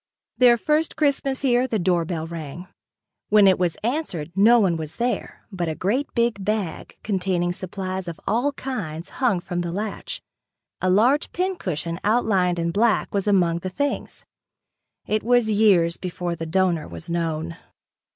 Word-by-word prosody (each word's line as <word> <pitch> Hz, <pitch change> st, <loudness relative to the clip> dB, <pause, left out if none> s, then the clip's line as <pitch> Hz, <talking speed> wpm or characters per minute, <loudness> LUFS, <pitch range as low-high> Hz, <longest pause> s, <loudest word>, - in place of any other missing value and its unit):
Their 245 Hz, -2 st, +6 dB
first 305 Hz, +5 st, 0 dB
Christmas 275 Hz, -2 st, 0 dB
here, 250 Hz, -1 st, +3 dB
the 230 Hz, -, -1 dB
doorbell 170 Hz, -3 st, 0 dB
rang. 165 Hz, 0 st, -7 dB, 0.6 s
When 210 Hz, -1 st, +6 dB
it 190 Hz, -1 st, +5 dB
was 175 Hz, -3 st, 0 dB
answered, 225 Hz, -, -2 dB
no 225 Hz, +5 st, +6 dB
one 190 Hz, -6 st, +2 dB
was 155 Hz, -1 st, -5 dB
there, 245 Hz, +1 st, -3 dB
but 175 Hz, -4 st, -2 dB
a 160 Hz, -, -3 dB
great 240 Hz, -, 0 dB, 0.3 s
bag 205 Hz, -3 st, -3 dB
containing 180 Hz, -3 st, 0 dB
supplies 185 Hz, 0 st, -5 dB
of 170 Hz, -1 st, -6 dB
all 245 Hz, +6 st, +1 dB
kinds 190 Hz, -, -5 dB
hung 235 Hz, -8 st, +3 dB
from 175 Hz, 0 st, -3 dB
the 170 Hz, -1 st, -3 dB
latch. 205 Hz, +3 st, -4 dB, 0.6 s
A 185 Hz, -, +1 dB
large 240 Hz, +10 st, +3 dB
pincushion 185 Hz, -, -2 dB
outlined 200 Hz, -5 st, +2 dB
in 170 Hz, 0 st, -1 dB
black 215 Hz, +3 st, +1 dB
was 200 Hz, 0 st, -1 dB
among 175 Hz, -4 st, +3 dB
the 185 Hz, -, -4 dB
things. 285 Hz, +9 st, -3 dB, 0.8 s
It 215 Hz, 0 st, 0 dB
was 240 Hz, -1 st, +3 dB
years 195 Hz, -6 st, +4 dB
before 175 Hz, -1 st, -4 dB
the 165 Hz, 0 st, -5 dB
donor 175 Hz, -1 st, +1 dB
was 85 Hz, -1 st, -9 dB
known. 165 Hz, -1 st, -2 dB
190 Hz, 150 wpm, -23 LUFS, 170-235 Hz, 0.8 s, Their